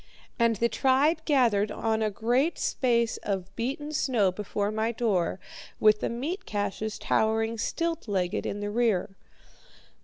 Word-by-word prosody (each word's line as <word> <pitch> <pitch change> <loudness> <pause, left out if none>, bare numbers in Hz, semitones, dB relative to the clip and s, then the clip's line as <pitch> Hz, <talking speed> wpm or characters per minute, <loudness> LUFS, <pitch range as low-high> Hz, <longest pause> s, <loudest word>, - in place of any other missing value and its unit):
And 230 -1 +3
the 235 +3 +2
tribe 280 +7 +2
gathered 230 -8 +3
on 220 +1 -1
a 215 - +2
great 245 - +1
space 235 -3 +1
of 195 -1 -4
beaten 280 +6 -3
snow 240 -10 +2
before 205 +1 -2
my 220 +1 0
door, 205 -6 0 0.4
with 215 0 +5
the - - -1
meat 310 - -4
caches 210 +1 -3
towering 225 +1 0
stilt 330 +3 -2
legged 185 -4 -1
in 205 - -4
the 205 0 -3
rear. 210 -5 +1
225 Hz, 145 wpm, -27 LUFS, 205-255 Hz, 0.4 s, with